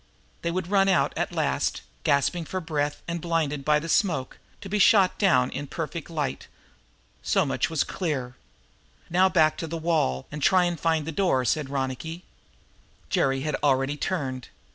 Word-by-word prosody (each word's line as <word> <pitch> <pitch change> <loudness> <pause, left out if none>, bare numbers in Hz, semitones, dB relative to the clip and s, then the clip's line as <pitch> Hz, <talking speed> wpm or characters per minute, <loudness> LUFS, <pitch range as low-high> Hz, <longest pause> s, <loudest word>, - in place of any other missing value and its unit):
They 170 - -1
would 175 0 -2
run 195 -1 +4
out 190 - +2
at - - -2
last, - - -1 0.2
gasping 140 +4 +1
for 185 - -3
breath 150 -4 -2
and 170 0 -3
blinded 155 -4 -1
by 150 +1 +3
the 155 +2 -4
smoke, 160 -7 0 0.2
to - - -7
be 210 +2 -1
shot 195 -2 +5
down 145 -11 +3
in 145 - -4
a - - -14
perfect 165 +1 -5
light. 155 -4 -3 0.7
So - - +2
much - - 0
was 160 -3 +1
clear. 135 -9 -3 0.8
"Now 185 +2 +4
back 160 -4 +3
to 165 - -4
the 165 +1 -4
wall 155 - 0
and 150 0 -6
try 180 +3 +4
to 175 - -1
find 160 -2 0
that 165 -1 -5
door," 175 -10 +2
said 145 +3 0
Ronicky. 140 +5 -4 0.9
Jerry 135 0 +1
had 150 +1 -1
already 135 0 +2
turned. 135 -7 -3
160 Hz, 175 wpm, -26 LUFS, 140-175 Hz, 0.9 s, shot